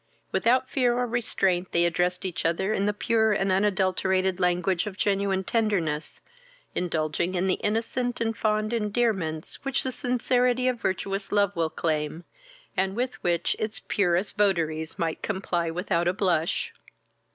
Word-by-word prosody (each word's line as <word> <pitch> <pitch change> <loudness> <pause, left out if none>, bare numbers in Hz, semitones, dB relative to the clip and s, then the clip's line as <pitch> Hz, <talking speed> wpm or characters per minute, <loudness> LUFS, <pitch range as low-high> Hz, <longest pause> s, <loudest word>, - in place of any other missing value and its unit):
Without 255 +2 +2
fear 245 -3 +1
or 250 - +1
restraint 195 -6 0
they 170 0 +3
addressed 180 +2 0
each 175 -3 -3
other 170 +5 +1
in 200 -1 0
the - - +3
pure 220 +1 +2
and 195 -1 +1
unadulterated 190 -1 +1
language 180 +2 +1
of 200 -2 -6
genuine 195 -2 +1
tenderness, 190 -9 -1 0.5
indulging 170 +1 -1
in 180 +1 +1
the 185 - +1
innocent 235 +3 -1
and 225 -1 0
fond 215 +1 0
endearments 210 -8 -1
which 275 -2 0
the 260 - -1
sincerity 250 0 +1
of 250 -2 0
virtuous 195 +1 -2
love 200 -1 +2
will 165 -1 +1
claim, 155 +1 -2 0.5
and 190 +1 0
with 250 +2 -2
which 175 -1 +1
its 215 0 -3
purest 180 0 +1
votaries 165 -6 0
might 165 -1 -2
comply 180 -4 -1
without 175 0 0
a 175 - +3
blush. 175 -5 0
195 Hz, 150 wpm, -26 LUFS, 175-220 Hz, 0.5 s, they